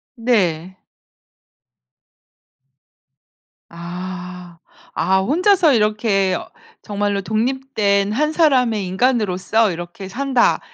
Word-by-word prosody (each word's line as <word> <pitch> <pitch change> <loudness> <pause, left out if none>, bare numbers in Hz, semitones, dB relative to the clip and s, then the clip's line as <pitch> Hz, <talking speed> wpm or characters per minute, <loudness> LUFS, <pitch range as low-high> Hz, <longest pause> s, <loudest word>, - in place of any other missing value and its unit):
네. 185 -7 0 2.9
아. 180 0 -8 0.3
아 190 0 +1
혼자서 345 - +3
이렇게 210 -3 +1
어 - - -6 0.3
정말로 205 -1 -2
'독립된 215 -3 0
한 300 +7 0
사람의 250 - +2
인간으로서 215 -1 +1
이렇게 175 +3 -8
산다.' 260 +3 +1
205 Hz, 170 characters per minute, -19 LUFS, 185-250 Hz, 2.9 s, 혼자서